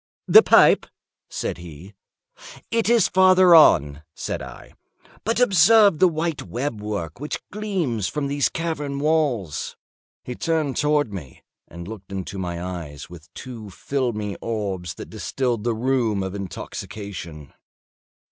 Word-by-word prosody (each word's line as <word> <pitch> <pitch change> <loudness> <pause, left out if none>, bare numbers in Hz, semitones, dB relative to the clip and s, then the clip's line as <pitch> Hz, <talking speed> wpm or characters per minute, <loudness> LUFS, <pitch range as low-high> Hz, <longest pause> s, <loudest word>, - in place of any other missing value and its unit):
"The - - +9
pipe," - - +5 0.4
said - - -4
he. 85 +3 -11 0.8
"It 230 -1 +1
is 235 -5 +4
farther 185 -1 +5
on," 75 - +5
said - - -4
I; - - -11 0.5
"but 230 +2 0
observe 200 -4 +5
the 185 - +6
white 165 -1 -2
web 120 -3 -4
work 100 -6 -5
which 150 +2 -4
gleams 180 - -2
from 150 -2 -3
these 140 0 0
cavern 150 -4 -3
walls." 140 - -1 0.5
He 125 - -6
turned 155 -1 -1
towards 150 -5 +1
me, 75 -10 -9 0.2
and 85 +1 -10
looked 100 -3 -10
into 95 0 -5
my 85 -2 -4
eyes 85 -5 -7
with 85 -2 -13
two 115 -5 -9
filmy 105 -2 -3
orbs 95 -7 -4
that - - -10
distilled 120 -5 -2
the 120 -2 0
rheum 115 -4 0
of 95 0 -5
intoxication. 95 -4 -7
120 Hz, 135 wpm, -23 LUFS, 95-155 Hz, 0.8 s, The